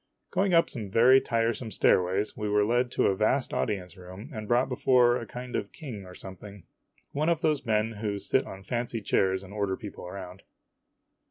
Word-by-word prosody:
Going 195 0 +1
up 165 - +5
some 110 -5 -6
very 125 +6 +6
tiresome 115 0 -1
stairways, 95 0 +2
we 105 -1 -3
were 105 0 +3
led 120 +3 +2
into 120 - 0
a 95 - +3
vast 120 +6 +1
audience 90 -5 -2
room 95 - -11
and 110 -2 -6
brought 120 +3 +3
before 125 -1 +3
a 115 - -6
kind 125 0 -7
of - - -3
king 115 - -8
or 90 - -11
something 100 0 -10 0.5
one 150 +3 0
of 165 -2 +1
those 150 -5 0
men 110 0 +1
who 105 -2 -3
sit 130 +6 0
on 95 0 -9
fancy 120 0 -2
chairs 95 -1 +1
and 95 +1 -11
order 100 -2 -1
people 100 -3 -8
around. 90 0 -8
110 Hz, 190 wpm, -28 LUFS, 95-125 Hz, 0.5 s, very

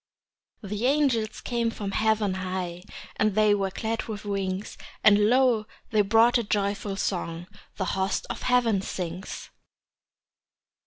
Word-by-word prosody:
The 210 +4 -1
angels 260 -7 +1
came 235 -1 -1
from 205 -3 -5
heaven 215 -1 +1
high, 185 -2 -4 0.4
And 215 -2 +1
they 215 -1 +5
were 195 -1 0
clad 220 +4 -3
with 215 -2 -6
wings; 195 -1 -3 0.3
And 210 0 +6
lo, 245 -4 +3 0.2
they 215 -2 +4
brought 225 +4 +4
a - - -1
joyful 200 -1 -1
song 175 -3 -3 0.3
The 190 - -2
host 190 +2 -1
of 240 - -5
heaven 240 -5 +2
sings. 180 0 -6
210 Hz, 130 wpm, -26 LUFS, 195-225 Hz, 0.4 s, And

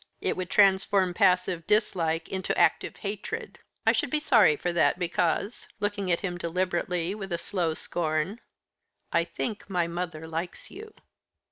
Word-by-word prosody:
It - - -1
would 185 -1 -4
transform 195 -2 +4
passive 180 -1 +2
dislike 175 -6 +1
into 190 -1 -2
active - - +2
hatred. 215 - -5 0.3
I - - +6
should - - 0
be 305 - +1
sorry 215 - +5
for 175 +3 -2
that, 170 - +3
because," 180 +4 -1
looking 205 -2 -1
at 170 - +1
him 175 -3 -3
deliberately, 175 0 -1
with 195 -3 -7
a 170 - 0
slow 170 -2 -2
scorn, 165 +7 -2 0.7
"I 170 - +4
think 210 +6 -5
my 180 -3 +1
mother 170 -2 -5
likes 165 +2 -5
you." 430 +3 -10
180 Hz, 150 wpm, -27 LUFS, 170-200 Hz, 0.7 s, I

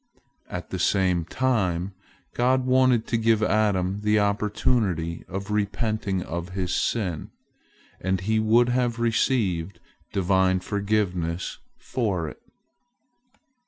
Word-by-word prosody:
At - - -6
the - - -3
same 90 -4 +2
time, 95 -6 0 0.4
God 130 +1 +2
wanted 130 -3 +3
to 115 - 0
give 110 -1 +3
Adam 100 -2 +1
the 105 0 +2
opportunity 100 -4 0
of 100 +2 -5
repenting 105 -2 -1
of 85 +1 -5
his 90 -1 -1
sin, 95 -9 -1 0.7
and 95 +1 0
he 110 +3 +1
would 115 +3 +4
have 125 -1 +1
received 110 -7 0 0.3
Divine 95 -1 +2
forgiveness 95 -4 -1 0.2
for 100 -10 -2
it. - - -13
100 Hz, 110 wpm, -25 LUFS, 90-115 Hz, 0.7 s, would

